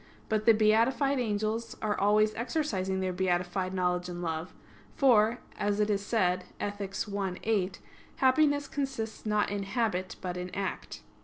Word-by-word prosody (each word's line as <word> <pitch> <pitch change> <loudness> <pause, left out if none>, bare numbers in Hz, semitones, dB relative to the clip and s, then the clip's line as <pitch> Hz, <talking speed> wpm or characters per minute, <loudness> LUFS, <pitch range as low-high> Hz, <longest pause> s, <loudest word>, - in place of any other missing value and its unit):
But 215 0 0
the 230 - +9
beatified 235 +6 +3
angels 220 0 -2
are 210 -1 0
always 215 +2 +3
exercising 200 -8 -1
their 185 -1 -1
beatified 180 0 0
knowledge 180 -1 0
and 175 0 -5
love; 165 0 -3 0.4
for, 235 -4 +4 0.2
as 205 0 0
is 205 -1 +1
said 185 -4 +1
Ethic. 205 -1 -4 0.2
i, 195 -2 -1
8, 195 -4 0 0.4
happiness 285 +2 +3
consists 265 -7 -4
not 210 -1 +1
in 205 -1 -2
habit, 195 -3 -1
but 180 -1 -4
in 180 0 -4
act. 195 -1 -4
205 Hz, 145 wpm, -30 LUFS, 185-225 Hz, 0.4 s, the